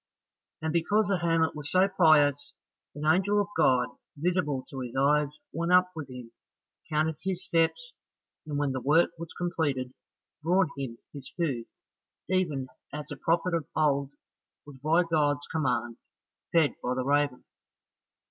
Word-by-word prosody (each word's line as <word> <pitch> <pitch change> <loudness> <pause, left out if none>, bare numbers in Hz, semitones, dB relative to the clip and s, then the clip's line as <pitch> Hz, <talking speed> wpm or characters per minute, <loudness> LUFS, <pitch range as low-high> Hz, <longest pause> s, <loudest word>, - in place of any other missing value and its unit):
And 160 0 -1
because 205 +5 +2
the 195 -2 +1
hermit 165 -1 +1
was 150 -1 -6
so 185 +1 +4
pious, 150 -6 +3 0.4
an 150 +1 -5
angel 190 +6 +3
of 205 0 0
God, 130 -6 +3 0.3
visible 150 -5 0
to 135 - -7
his 125 -1 -6
eyes, 145 +2 +2 0.2
went 170 +3 -1
up 180 0 +5
with 150 -4 -6
him, 125 -2 -9 0.6
counted 155 0 0
his 190 -1 -3
steps, 170 - 0 0.5
and 145 -2 -3
when 145 -1 0
the 130 -1 -3
work 155 +7 +4
was 170 -1 -7
completed, 145 -8 -1 0.5
brought 175 +1 +2
him 130 -4 -5 0.2
his 140 -3 -9
food, 135 -9 -1 0.6
even 170 -8 0 0.3
as 150 0 -5
the - - -4
prophet 170 +5 0
of 165 -4 -1
old 140 -3 +2 0.6
was 145 -2 -12
by 165 +4 +4
God's 145 -3 +1
command 125 -6 -1 0.5
fed 165 -4 +4
by 125 +1 -1
the 130 0 -2
raven. 145 -2 +1
150 Hz, 150 wpm, -28 LUFS, 140-170 Hz, 0.6 s, up